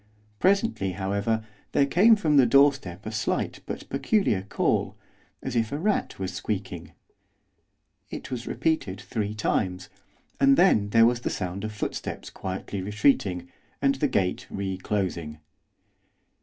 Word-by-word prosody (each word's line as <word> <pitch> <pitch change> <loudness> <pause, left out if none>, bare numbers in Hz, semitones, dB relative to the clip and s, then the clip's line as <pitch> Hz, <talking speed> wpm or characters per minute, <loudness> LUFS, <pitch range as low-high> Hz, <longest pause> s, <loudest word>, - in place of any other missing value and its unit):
Presently, 195 - +2
however, 100 +4 -1 0.3
there 140 - +4
came 195 +11 +6
from 155 -8 +2
the 130 -3 +6
doorstep 115 -8 +3
a 110 - -4
slight 110 - -1
but - - -6
peculiar 195 - +1
call, 100 - 0 0.5
as 130 - -4
if 115 -2 +1
a 145 - -2
rat 200 +6 -1
was 95 0 -4
squeaking. 95 -4 -4 1.2
It - - -7
was 120 -2 -4
repeated 105 -13 -1
three 105 -1 -3
times, 95 -4 -1 0.5
and 135 0 +5
then 110 - +4
there 115 +2 +6
was 120 +1 +2
the - - -1
sound 95 0 -4
of 110 - -3
footsteps 105 - -5
quietly 95 +1 -5
retreating, 100 -3 +1 0.3
and 140 0 +3
the 140 +2 0
gate 100 -8 -1
re 95 -1 -3
closing. 90 -5 -3
105 Hz, 140 wpm, -26 LUFS, 95-135 Hz, 1.2 s, came